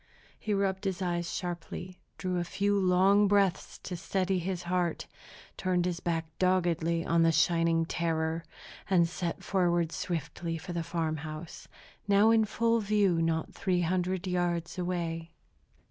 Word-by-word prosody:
He 215 Hz, -, -4 dB
rubbed 195 Hz, 0 st, -1 dB
his 190 Hz, -2 st, -1 dB
eyes 175 Hz, -2 st, -1 dB
sharply, 180 Hz, 0 st, -5 dB, 0.2 s
drew 185 Hz, -1 st, -1 dB
a -, -, 0 dB
few 200 Hz, +4 st, 0 dB
long 190 Hz, +2 st, +4 dB
breaths 200 Hz, -2 st, +1 dB
to 180 Hz, -, -4 dB
steady 185 Hz, +2 st, -1 dB
his 180 Hz, 0 st, -3 dB
heart, 175 Hz, -1 st, -1 dB, 0.5 s
turned 180 Hz, -2 st, +1 dB
his 180 Hz, -1 st, -1 dB
back 165 Hz, -2 st, -1 dB
doggedly 170 Hz, -3 st, +1 dB
on 170 Hz, 0 st, +3 dB
the 165 Hz, 0 st, +5 dB
shining 165 Hz, 0 st, +2 dB
terror, 165 Hz, 0 st, -1 dB, 0.5 s
and 175 Hz, -3 st, +4 dB
set 175 Hz, 0 st, -4 dB
forward 175 Hz, -3 st, +1 dB
swiftly 165 Hz, 0 st, -3 dB
for 175 Hz, +3 st, -7 dB
the 170 Hz, -, -1 dB
farm 165 Hz, -1 st, -2 dB
house, 155 Hz, +2 st, -8 dB, 0.4 s
now 205 Hz, +2 st, +5 dB
in 225 Hz, -1 st, +4 dB
full 230 Hz, +2 st, +1 dB
view 200 Hz, -5 st, +2 dB
not 165 Hz, -1 st, -1 dB
three 185 Hz, -2 st, 0 dB
hundred 180 Hz, +2 st, 0 dB
yards 175 Hz, -1 st, -1 dB
away. 170 Hz, -2 st, -3 dB
175 Hz, 145 wpm, -30 LUFS, 165-190 Hz, 0.5 s, the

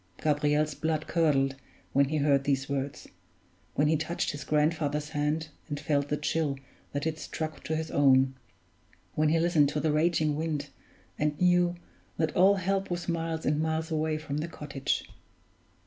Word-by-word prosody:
Gabriel's 150 Hz, 0 st, +2 dB
blood 155 Hz, 0 st, -1 dB
curdled 150 Hz, -5 st, +2 dB, 0.4 s
when 140 Hz, +1 st, +5 dB
he 155 Hz, +3 st, -1 dB
heard 140 Hz, -2 st, +3 dB
these 135 Hz, -1 st, 0 dB
words 140 Hz, 0 st, -3 dB, 0.7 s
when 145 Hz, -, +3 dB
he 160 Hz, -, +3 dB
touched 160 Hz, +3 st, -1 dB
his 145 Hz, -1 st, -6 dB
grandfather's 150 Hz, -1 st, 0 dB
hand, 150 Hz, +1 st, -1 dB, 0.2 s
and 145 Hz, -1 st, -3 dB
felt 145 Hz, -1 st, 0 dB
the 150 Hz, -, 0 dB
chill 150 Hz, -2 st, -1 dB, 0.3 s
that 145 Hz, +1 st, -3 dB
it 160 Hz, -1 st, -2 dB
struck 155 Hz, 0 st, -5 dB
to 160 Hz, -, -2 dB
his 160 Hz, 0 st, -3 dB
own 135 Hz, -2 st, +4 dB, 0.8 s
when 155 Hz, 0 st, +2 dB
he 165 Hz, +1 st, +3 dB
listened 160 Hz, -4 st, +4 dB
to 150 Hz, -, -2 dB
the 155 Hz, 0 st, +1 dB
raging 155 Hz, -1 st, +2 dB
wind, 150 Hz, -2 st, -2 dB, 0.5 s
and 150 Hz, -1 st, 0 dB
knew 180 Hz, -1 st, +3 dB, 0.4 s
that 160 Hz, -1 st, 0 dB
all 190 Hz, +3 st, +6 dB
help 195 Hz, +1 st, -1 dB
was 175 Hz, -1 st, -3 dB
miles 165 Hz, -1 st, -2 dB
and 150 Hz, +1 st, +2 dB
miles 160 Hz, +1 st, -1 dB
away 155 Hz, 0 st, 0 dB
from 150 Hz, -2 st, -4 dB
the 160 Hz, -, -2 dB
cottage. 145 Hz, -4 st, -3 dB
155 Hz, 165 wpm, -29 LUFS, 145-160 Hz, 0.8 s, all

